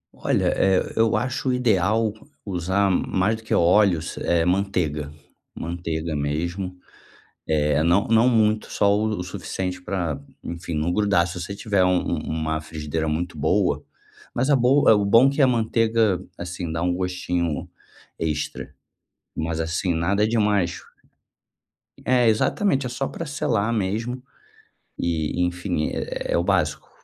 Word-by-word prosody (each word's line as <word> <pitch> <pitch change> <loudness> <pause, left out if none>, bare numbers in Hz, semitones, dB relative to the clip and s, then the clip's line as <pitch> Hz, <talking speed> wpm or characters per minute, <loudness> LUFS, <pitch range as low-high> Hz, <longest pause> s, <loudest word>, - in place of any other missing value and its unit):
Olha, - - +1
eh, 95 -1 +2
eu 115 0 +3
acho 130 +1 -2
o - - +2
ideal 110 -2 +2 0.3
usar 95 +1 0
mais 95 +3 +1
do - - -13
que 110 - -3
óleos, 85 -1 +3
eh, 85 -1 +1
manteiga. 90 -6 0 0.4
Manteiga 80 -1 -3
mesmo. 85 +6 -2 0.7
Eh, 75 -1 +1
não 85 +5 +3
não 115 +2 +4
muito, 110 -2 +2
só 100 -1 +3
o 110 +1 0
o 90 - -3
suficiente 90 0 -4
para 85 -6 -2 0.2
enfim, 85 0 -6
não 80 +3 0
grudar. 100 -4 +2
Se 90 0 -6
você 90 +3 -5
tiver, 100 -2 +1
um 90 0 +3 0.2
um - - 0
uma 80 0 -2
frigideira 80 0 -4
muito 80 +1 -3
boa, 75 -1 +1 0.5
mas 130 +4 0
a 145 - +6
bo 130 +3 +3
é - - +9
o 105 -1 +2
bom 115 +7 +6
que 140 +2 0
a 135 - +6
manteiga, 115 -4 +2 0.2
assim, 90 -1 -5
dá 80 - -2
um 90 0 +1
gostinho 90 -4 -2 0.5
extra. 75 -2 -3 0.6
Mas, 80 0 -2
assim, 85 +3 -1
nada 95 +6 +1
demais. 105 -6 +1 1.3
É. 125 -2 +3
Exatamente. 135 - +2
É - - -2
só 135 +3 -2
para 170 - -6
selar 125 -8 0
mesmo, 115 +5 -2 0.7
e 85 0 -1
enfim, 90 -2 -1
é - - -3
é - - +3
o - - +1
básico. - - 0
95 Hz, 150 wpm, -23 LUFS, 85-110 Hz, 1.3 s, é